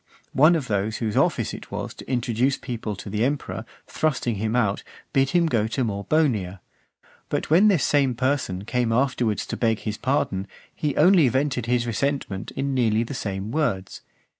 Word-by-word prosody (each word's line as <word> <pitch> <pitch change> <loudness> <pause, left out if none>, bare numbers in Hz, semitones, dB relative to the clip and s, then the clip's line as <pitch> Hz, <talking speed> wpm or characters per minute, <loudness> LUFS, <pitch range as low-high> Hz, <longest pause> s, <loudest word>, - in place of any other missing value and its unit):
one 155 +5 +6
of 145 -6 -2
those 105 +1 -1
whose 110 -3 -2
office - - +1
it - - -9
was - - -5
to - - -10
introduce 125 +2 +1
people 115 -4 -5
to 100 - -10
the 105 +2 -1
emperor, 140 +2 -2 0.2
thrusting 135 -6 -1
him 110 +3 -1
out, 105 -5 +1 0.3
bid 135 0 +3
him 175 +1 +3
go 115 -8 +1
to 125 +4 -1
Morbonia. 105 - 0 0.7
But - - -2
when 185 +7 +6
this 190 -8 +3
same 140 -4 +2
person 125 -7 -1
came 120 0 0
afterwards 120 -3 +1
to - - -5
beg 115 -2 +1
his 105 -1 -4
pardon, 100 -8 0 0.3
he 150 -2 -2
only 165 -4 +5
vented 130 -2 0
his 120 0 +1
resentment 120 -4 -2
in 135 0 -1
nearly 115 -3 +2
the 120 - -6
same 100 -3 -4
words. 115 -11 -1
120 Hz, 175 wpm, -24 LUFS, 110-140 Hz, 0.7 s, one